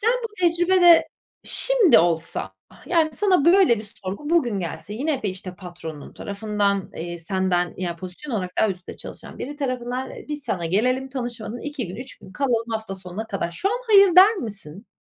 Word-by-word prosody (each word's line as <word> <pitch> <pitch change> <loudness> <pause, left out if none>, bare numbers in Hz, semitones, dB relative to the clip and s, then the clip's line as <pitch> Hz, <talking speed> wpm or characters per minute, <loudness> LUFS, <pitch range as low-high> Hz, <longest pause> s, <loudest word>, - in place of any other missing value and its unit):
Sen 455 +3 +3
bu 460 - -1
tecrübede 350 0 +5 0.4
şimdi 470 - +4
olsa 165 - 0 0.2
ah, - - -19
yani, 320 -3 +2
sana 370 -8 +2
böyle 345 - +5
bir 210 -1 -9
sorgu 205 - -5
bugün 240 - +2
gelse 165 +3 -6
yine 280 +3 -1
de, 210 - 0
işte, 185 -1 -7
patronun 170 -5 -9
tarafından, 200 -1 -2
eee, 175 +1 -5
senden, 180 0 0
yani, 175 -2 -3
pozisyon 185 - -8
olarak 185 -3 -3
daha 220 - +4
üstte 180 -1 -8
çalışan - - -10
biri 290 +2 -6
tarafından, 255 -2 -3
eee, - - -10
"Biz 295 -1 -4
sana 170 -3 -2
gelelim 255 +9 +1
tanışmadan 240 -3 -5
2 290 -5 -4
gün 185 - -7
3 255 +2 -8
gün 190 - -14
kalalım 240 -5 0
hafta 220 -3 -3
sonuna 190 +3 -7
kadar." 195 -5 -3
Şu 385 - 0
an 465 - -1
"hayır" 395 -4 +7
der 405 +5 +9
misin? 200 - -7
225 Hz, 185 wpm, -23 LUFS, 185-295 Hz, 0.4 s, der